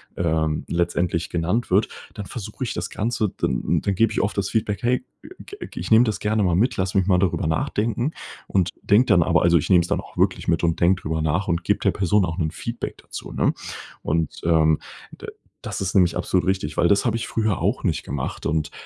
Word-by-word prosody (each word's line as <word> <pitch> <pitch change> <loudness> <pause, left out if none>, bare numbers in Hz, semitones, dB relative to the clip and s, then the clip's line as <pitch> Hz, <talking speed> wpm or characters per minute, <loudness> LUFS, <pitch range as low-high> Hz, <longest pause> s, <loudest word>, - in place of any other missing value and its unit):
ähm, 80 -2 0
letztendlich 85 0 0
genannt 90 +8 -1
wird, 100 +4 +3 0.2
dann 105 - -6
versuche 110 +2 -6
ich 120 - -2
das 85 +2 -4
Ganze 110 -1 -1
dann - - 0
dann 100 - -1
gebe 115 +4 +2
ich - - +1
oft 100 - -2
das 100 0 0
Feedback: 105 -2 -1
„Hey, 125 +1 +1 0.4
ge 405 +1 -9
ge - - -8
ich - - -6
nehme 115 +2 +7
das 110 -3 -2
gerne 105 0 +1
mal 90 -3 +2
mit, 120 +7 +1
lass 95 +1 -1
mich 95 -2 +2
mal 90 -2 +4
darüber 90 -4 0
nachdenken“ 110 - 0 0.4
und 95 -2 +1
denke 105 +5 +4
dann 85 - +5
aber - - +3
also, 85 0 +5
ich 75 - -2
nehme 90 -3 +6
es 85 - -3
dann - - +1
auch - - -11
wirklich - - +1
mit 85 0 +1
und 85 0 +1
denke 90 +1 +3
drüber 80 +1 -2
nach 80 +5 0
und 85 0 -1
gebe 105 - +2
der 100 - +3
Person 100 +2 +2
auch 85 -1 -4
'nen 80 -4 -1
Feedback 115 +6 -5
dazu, - - -9
ne? - - +1 0.5
Und, 80 0 -1
ähm, 80 -2 +4 0.4
da - - -10 0.3
das - - -5
ist 95 -2 -2
nämlich 90 -4 +4
absolut 90 -1 0
richtig, 95 -6 -1
weil 85 - +4
das 100 +2 +3
habe 115 -2 +1
ich 115 - -4
früher 110 -4 0
auch - - 0
nicht - - 0
gemacht. 65 -1 -5
Und, 80 -2 -1
95 Hz, 230 wpm, -23 LUFS, 85-105 Hz, 0.5 s, nehme